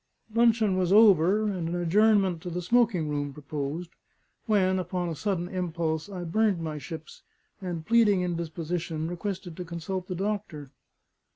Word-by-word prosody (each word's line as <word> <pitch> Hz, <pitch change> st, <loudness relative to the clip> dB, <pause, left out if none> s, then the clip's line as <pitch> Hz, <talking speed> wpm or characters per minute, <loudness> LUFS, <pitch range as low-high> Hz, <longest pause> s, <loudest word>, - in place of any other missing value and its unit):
Luncheon 225 Hz, -4 st, +3 dB
was 180 Hz, -1 st, +1 dB
over, 200 Hz, -1 st, +6 dB
and 185 Hz, -6 st, -2 dB
an 175 Hz, -, -2 dB
adjournment 190 Hz, 0 st, +3 dB
to 180 Hz, -, -6 dB
the 175 Hz, +1 st, -4 dB
smoking 220 Hz, -5 st, +2 dB
room 145 Hz, -1 st, -2 dB
proposed, 150 Hz, +3 st, -5 dB, 0.6 s
when 190 Hz, -3 st, +3 dB
(upon 180 Hz, -1 st, -2 dB
a 165 Hz, -, -4 dB
sudden 180 Hz, 0 st, -2 dB
impulse) 170 Hz, -3 st, -2 dB
I 185 Hz, -3 st, -6 dB
burned 200 Hz, +2 st, +1 dB
my 155 Hz, -2 st, -4 dB
ships, 155 Hz, +3 st, -9 dB, 0.4 s
and 175 Hz, -4 st, -5 dB
pleading 210 Hz, -4 st, +4 dB
indisposition, 165 Hz, -1 st, -3 dB
requested 175 Hz, 0 st, -5 dB
to 180 Hz, -, -4 dB
consult 180 Hz, +2 st, -5 dB
the 180 Hz, -, -4 dB
doctor. 190 Hz, -8 st, -4 dB
180 Hz, 150 wpm, -27 LUFS, 165-200 Hz, 0.6 s, over